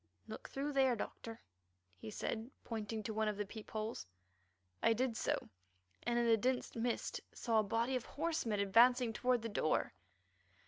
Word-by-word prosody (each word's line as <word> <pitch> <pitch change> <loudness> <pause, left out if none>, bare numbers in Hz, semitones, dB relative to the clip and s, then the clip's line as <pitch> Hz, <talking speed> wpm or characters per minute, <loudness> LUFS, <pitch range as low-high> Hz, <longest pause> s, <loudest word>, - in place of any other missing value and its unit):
"Look - - -7
through 285 +2 -2
there, 265 -2 +4
Doctor," 225 +1 -6 0.6
he 105 +4 -8
said, 220 - -3
pointing 220 -1 -4
to 220 - -3
one 220 0 +1
of 210 -1 -1
the 205 - -1
peep 215 +2 -9
holes. 215 - -4 0.7
I 230 - +5
did 245 0 0
so, - - -1 0.5
and 240 0 0
in 240 - +3
the 225 -1 +5
dense 250 +3 0
mist 235 +1 -1
saw 225 -3 +2
a - - +3
body 230 +5 0
of 250 - -2
horsemen 300 -9 -1
advancing 235 +4 +5
toward 250 0 +1
the 230 - -2
door. 155 -6 +1
230 Hz, 170 wpm, -37 LUFS, 215-250 Hz, 0.7 s, I